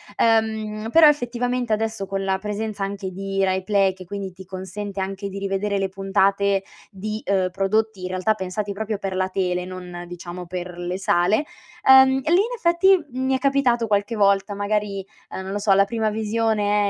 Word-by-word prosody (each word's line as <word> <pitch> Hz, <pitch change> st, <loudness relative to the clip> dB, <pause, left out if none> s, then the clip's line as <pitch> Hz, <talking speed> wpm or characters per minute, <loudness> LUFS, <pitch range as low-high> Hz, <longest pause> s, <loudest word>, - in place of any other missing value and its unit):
ehm, 220 Hz, -1 st, +1 dB
però 320 Hz, +1 st, +8 dB
effettivamente 245 Hz, -4 st, 0 dB
adesso 220 Hz, -1 st, -2 dB
con 195 Hz, 0 st, -3 dB
la 190 Hz, 0 st, +1 dB
presenza 210 Hz, +1 st, -4 dB
anche 195 Hz, -1 st, -4 dB
di 195 Hz, +1 st, -2 dB
RaiPlay- 190 Hz, +1 st, +2 dB
che 185 Hz, -1 st, -11 dB
quindi 195 Hz, +1 st, -5 dB
ti 190 Hz, +1 st, -13 dB
consente 190 Hz, +2 st, -6 dB
anche 195 Hz, +1 st, -4 dB
di 195 Hz, 0 st, -6 dB
rivedere 195 Hz, +1 st, -1 dB
le 195 Hz, 0 st, -1 dB
puntate, 195 Hz, +1 st, +1 dB, 0.3 s
di, 215 Hz, +2 st, -5 dB
ehm, 190 Hz, -2 st, +1 dB
prodotti 195 Hz, +1 st, 0 dB
in 180 Hz, -, -3 dB
realtà 185 Hz, +4 st, +1 dB
pensati 200 Hz, +1 st, -4 dB
proprio 215 Hz, 0 st, -3 dB
per 195 Hz, -2 st, -3 dB
la 185 Hz, 0 st, 0 dB
tele, 180 Hz, -1 st, -1 dB
non, 180 Hz, -1 st, -8 dB
diciamo, 175 Hz, +1 st, -8 dB
per 180 Hz, 0 st, -6 dB
le 175 Hz, +1 st, -4 dB
sale- 190 Hz, -, +2 dB, 0.4 s
ehm, 265 Hz, 0 st, +9 dB
lì 320 Hz, -, +1 dB
in 415 Hz, +6 st, +2 dB
effetti 355 Hz, -2 st, +3 dB
mi 260 Hz, +1 st, 0 dB
è -, -, -1 dB
capitato 255 Hz, -4 st, +2 dB
qualche 205 Hz, +2 st, 0 dB
volta, 200 Hz, -1 st, +2 dB
magari, 205 Hz, -1 st, -1 dB, 0.3 s
uhm, -, -, -5 dB
non 190 Hz, 0 st, -6 dB
lo -, -, -1 dB
so, 205 Hz, -1 st, +3 dB
la 195 Hz, +1 st, +5 dB
prima 220 Hz, +1 st, -1 dB
visione 210 Hz, -1 st, +1 dB
200 Hz, 180 wpm, -23 LUFS, 190-220 Hz, 0.4 s, ehm